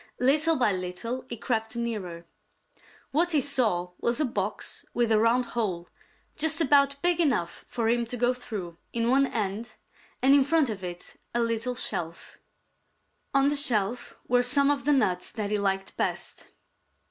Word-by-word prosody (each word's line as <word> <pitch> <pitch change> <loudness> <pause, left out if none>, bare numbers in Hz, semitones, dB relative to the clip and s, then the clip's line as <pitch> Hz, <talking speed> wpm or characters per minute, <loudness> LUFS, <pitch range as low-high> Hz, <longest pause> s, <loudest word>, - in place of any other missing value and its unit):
Little 305 +6 +3
by 245 -6 +2
little 185 +8 -4
he 235 - -4
crept 225 0 -2
nearer. 200 -8 -4 0.9
What 340 +4 +1
he 300 - +4
saw 215 -10 +1
was 235 +3 0
a 305 - +2
box 255 - -3
with 235 -2 +1
a 215 - +4
round 235 +3 +3
hole, 185 -7 -2 0.5
just 315 +1 +2
about 280 -2 +3
big 350 -1 +3
enough 255 - 0
for 230 -2 -2
him 235 0 +1
to 245 - -5
go 245 +1 +2
through, 195 -9 -7
in 235 +1 0
one 275 +1 +4
end, 215 0 -3 0.4
and 270 +2 +5
in 280 -1 +6
front 290 -3 +2
of 195 -3 -7
it 175 -1 -7 0.2
a - - +2
little 230 +1 -1
shelf. 175 -8 -3 1.0
On 275 +1 +4
the 290 - 0
shelf 240 -4 +2
were 245 0 +3
some 280 +3 +3
of 280 -1 -2
the 295 - +4
nuts 185 -10 +1
that 210 -2 -3
he 210 - +1
liked 195 -1 -1
best. - - -3
235 Hz, 170 wpm, -27 LUFS, 205-275 Hz, 1.0 s, in